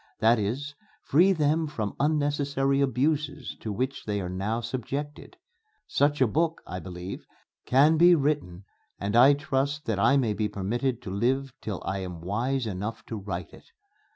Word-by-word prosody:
That 115 +1 +4
is, 130 +9 -3 0.3
free 175 +7 +4
them 155 -1 +1
from 110 -9 -4
unnecessary 145 -2 +1
abuses 140 +3 0
to 110 - -5
which 130 +6 -3
they 105 -1 -1
are 90 -2 -4
now 100 +5 -2
subjected. 140 - -5 0.5
Such 145 -5 +1
a 130 - +6
book, 160 +7 0
I 90 - -5
believe, 90 +2 -7 0.4
can 145 +5 +5
be 175 +2 +7
written 140 - -1 0.3
and 100 +2 -2
I 135 +4 +7
trust 145 +1 -1
that 110 -3 -1
I 135 +7 +4
may 115 -6 +1
be 105 0 -1
permitted 115 +6 -2
to 95 - -6
live 130 +6 0
till 100 -4 -5
I 95 +1 -2
am 90 -3 -6
wise 120 +8 -1
enough 110 +3 -4
to 115 - -3
write 95 -5 -5
it. - - -15
125 Hz, 165 wpm, -27 LUFS, 100-145 Hz, 0.5 s, be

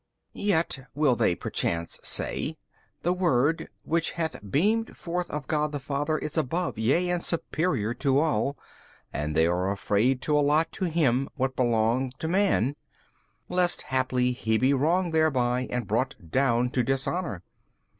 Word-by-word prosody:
B. - - -9
Yet 165 -7 +2 0.2
(will 145 -4 +3
they 90 - +2
perchance 85 -1 -3
say) - - -2 0.5
the 175 - +2
Word 165 -4 +1 0.2
which 165 +1 0
hath 165 -2 -2
beamed 215 - +1
forth 175 +1 -3
of 150 -1 -4
God 150 0 0
the 145 - -3
Father 145 +3 -1
is 155 +2 -2
above, 160 -2 -2
yea 165 +11 +2
and 175 -1 0
superior 155 - -1
to 135 +2 +1
all; 140 -3 +1 0.6
and 75 +1 -2
they 80 - +5
are 90 +2 +1
afraid 105 +6 +1
to 150 - +1
allot 150 +2 +3
to 190 - -2
Him 140 -6 +1
what 130 -2 -1
belong 120 +1 +1
to 160 - -3
man, 170 - +2 0.7
lest 180 -1 +1
haply 130 -1 +1
He 110 -3 0
be 130 +4 +3
wronged 165 +5 +1
thereby 130 -6 +2
and 125 -2 -2
brought - - 0 0.2
down 125 -2 +2
to 130 - +1
dishonour. 135 - -2
140 Hz, 155 wpm, -27 LUFS, 125-165 Hz, 0.7 s, they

